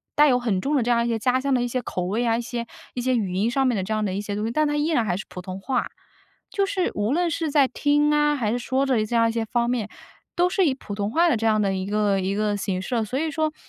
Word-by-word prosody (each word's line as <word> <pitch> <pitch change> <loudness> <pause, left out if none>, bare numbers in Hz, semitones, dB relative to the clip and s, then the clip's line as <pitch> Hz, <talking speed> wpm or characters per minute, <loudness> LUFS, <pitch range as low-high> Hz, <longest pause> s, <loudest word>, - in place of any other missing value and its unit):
带 300 0 +6
有 250 - +4
很 215 -6 0
重 290 +2 0
的 255 - +2
这 240 - 0
样 235 0 +2
一 - - -1
些 230 - 0
家 255 +3 +1
乡 275 0 0
的 250 - +2
一 245 - 0
些 250 +1 -2
口 180 -5 -4
味 220 +6 -1
啊， 225 0 +2
一 - - -2
些 235 -1 -4 0.3
一 245 - -3
些 255 0 +1
语 200 -6 -1
音 205 +5 +1
上 270 +2 +1
面 250 -3 +2
的 190 - -1
这 215 +3 -3
样 215 0 0
的 190 -2 -1
一 200 - -2
些 205 -1 -4
东 210 - -2
西， 230 - -2
但 305 +3 +2
它 295 - -1
依 295 +2 +1
然 245 -9 +1
还 180 - 0
是 210 - -6
普 180 - -8
通 185 +1 -7
话。 255 +1 -1 0.6
就 395 -1 +1
是 375 -2 -1
无 210 +6 0
论 345 0 +1
是 320 0 -1
在 280 -2 +4
听 295 +2 +2
啊， 295 0 +3
还 220 -6 -1
是 245 - -1
说 265 +3 0
着 235 -5 +1
这 235 - -3
样 230 0 +4
一 - - -1
些 230 -1 -1
方 235 +1 0
面， 225 -4 -1 0.5
都 355 +1 +3
是 380 -1 +2
以 275 - +2
普 205 - -8
通 200 0 -2
话 335 +8 +3
的 285 - +3
这 225 - -3
样 215 -1 +3
的 195 -1 +1
一 190 0 -3
个 205 -2 +1
一 190 +1 -1
个 210 -1 0
形 190 -2 -2
式 250 - -5
了。 225 -2 +1
所 255 +5 -3
以 315 +1 -1
说 310 0 -1
240 Hz, 350 characters per minute, -24 LUFS, 210-280 Hz, 0.6 s, 带